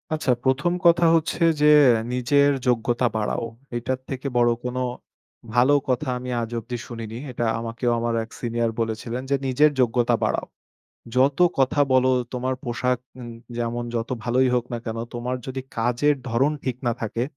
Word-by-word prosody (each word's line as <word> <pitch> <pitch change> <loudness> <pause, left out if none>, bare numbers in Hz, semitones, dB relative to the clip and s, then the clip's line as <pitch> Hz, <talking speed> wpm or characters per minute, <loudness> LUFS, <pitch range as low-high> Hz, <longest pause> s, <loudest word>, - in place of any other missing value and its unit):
আচ্ছা, 155 -4 0
১ম 140 +7 +2
কথা 170 0 +5
হচ্ছে 165 +1 0 0.2
যে 150 - +5 0.5
নিজের 140 +3 +3 0.2
যোগ্যতা 120 +1 +2
বাড়াও। 110 +2 -1 0.3
এটার 130 +2 -2
থেকে 135 0 -4
বড় 120 0 +4 0.2
কোনো 125 +1 -2 0.7
ভালো 125 +4 +5 0.2
কথা 130 +3 0
আমি 125 0 -6
আজ 115 - -4
অব্দি 120 +2 -6
শুনিনি। 115 -2 -7
এটা 120 -1 -2
আমাকেও 115 +1 -2
আমার 115 0 -1
এক 110 - -12
সিনিয়র 115 -1 -1
বলেছিলেন 115 +2 -3
যে, 140 - +3
"নিজের 145 +4 +4
যোগ্যতা 120 0 +2
বাড়াও। - - -1 0.7
যত 135 +3 +3 0.2
কথা 135 +2 +2
বলো 130 0 +4 0.2
তোমার 130 +1 -1
পোশাক 125 0 0 0.2
এ - - -7 0.3
যেমন 120 0 -2
যত 115 0 -2
ভালোই 125 +2 +2
হোক 120 -1 0
না - - -1
কেনো, 115 0 -3
তোমার 120 +1 -3
যদি 130 0 -4 0.2
কাজের 125 +6 +2
ধরন 130 +6 +2
ঠিক 125 -2 -2
না 120 - +2
থাকে। 115 +1 -2
125 Hz, 160 wpm, -23 LUFS, 115-130 Hz, 0.7 s, কথা